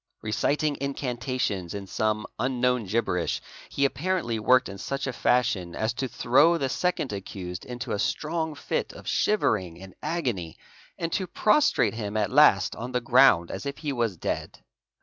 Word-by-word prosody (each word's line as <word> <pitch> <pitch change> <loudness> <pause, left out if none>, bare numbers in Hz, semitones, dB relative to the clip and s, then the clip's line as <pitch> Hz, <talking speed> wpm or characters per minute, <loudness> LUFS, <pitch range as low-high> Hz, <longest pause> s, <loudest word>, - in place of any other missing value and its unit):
Reciting 145 +7 0
incantations 125 -9 -2
in 100 -1 -5
some 105 +2 -1
unknown, 125 -3 +1
gibberish, 95 -4 0 0.3
he 140 - +1
apparently 145 -6 -1
worked 125 +4 +4
in 100 0 -8
such 140 +6 -3
a 130 - -3
fashion 115 -9 +1
as 110 +1 -1
to 130 +2 -2
throw 145 +8 +4
the 135 -4 -1
second 175 - -1
accused 95 -2 -6
into 125 -1 -6
a 100 - -1
strong 160 +3 -1
fit 135 - -3
of - - -12
shivering 95 - +1
and 95 0 -11
agony, 125 - -2 0.4
and 165 -1 -3
to 190 - -1
prostrate 285 - +3
him 110 -2 -4
at 105 -2 0
last 135 -9 +5
on 125 +2 -6
the 125 - +2
ground 120 -8 +5
as - - -5
if 140 - -4
he 150 -3 -3
was 115 -7 -1
dead. - - -4
125 Hz, 165 wpm, -26 LUFS, 105-140 Hz, 0.4 s, last